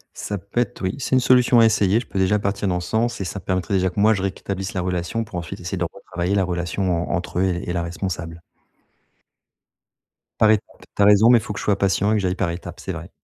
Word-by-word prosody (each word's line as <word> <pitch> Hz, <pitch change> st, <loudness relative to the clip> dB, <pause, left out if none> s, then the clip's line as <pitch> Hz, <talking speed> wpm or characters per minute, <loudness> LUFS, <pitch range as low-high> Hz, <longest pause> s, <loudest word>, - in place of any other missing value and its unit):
Ça 105 Hz, -, -4 dB
peut 100 Hz, +6 st, -2 dB
être 115 Hz, -, -4 dB
oui 95 Hz, 0 st, -1 dB
c'est 130 Hz, -, 0 dB
une -, -, +5 dB
solution 125 Hz, -1 st, +4 dB
à 115 Hz, -, +7 dB
essayer, 105 Hz, -1 st, +3 dB
je 120 Hz, -, -8 dB
peux 95 Hz, -, -3 dB
déjà 95 Hz, +3 st, +2 dB
partir 100 Hz, 0 st, -2 dB
dans 90 Hz, -1 st, 0 dB
ce 85 Hz, -, -7 dB
sens 115 Hz, -1 st, 0 dB
et -, -, -2 dB
ça 100 Hz, -, -5 dB
permettrait 95 Hz, 0 st, -2 dB
déjà 95 Hz, 0 st, +2 dB
que 95 Hz, -, -6 dB
moi 110 Hz, +2 st, +5 dB
je 95 Hz, -, -2 dB
rétablisse 95 Hz, 0 st, -4 dB
la 95 Hz, -, -1 dB
relation 90 Hz, +5 st, -2 dB
pour 110 Hz, -, -11 dB
ensuite 85 Hz, +3 st, -6 dB
essayer 90 Hz, +2 st, -4 dB
de 85 Hz, -, 0 dB
retravailler 90 Hz, 0 st, -3 dB
la 95 Hz, -, +3 dB
relation 90 Hz, 0 st, -1 dB
en -, -, +1 dB
entre 90 Hz, 0 st, -3 dB
eux -, -, +3 dB
et 90 Hz, -1 st, -2 dB
et 85 Hz, -, -1 dB
la 85 Hz, -1 st, -1 dB
responsable. 85 Hz, -1 st, -5 dB, 2.0 s
Par 110 Hz, -1 st, +6 dB
étape, 110 Hz, -, -2 dB
tu -, -, -1 dB
as -, -, +6 dB
raison, 105 Hz, +3 st, +6 dB
mais 120 Hz, -1 st, +7 dB
il -, -, -9 dB
faut 110 Hz, -1 st, -6 dB
que -, -, -6 dB
je -, -, -6 dB
sois 100 Hz, -2 st, +2 dB
patient 100 Hz, +1 st, +1 dB
et -, -, +3 dB
que -, -, +2 dB
j'aille 90 Hz, 0 st, 0 dB
par 85 Hz, -, -1 dB
étape, 85 Hz, +1 st, -8 dB
c'est -, -, -5 dB
vrai. -, -, -8 dB
95 Hz, 270 wpm, -22 LUFS, 90-105 Hz, 2.0 s, à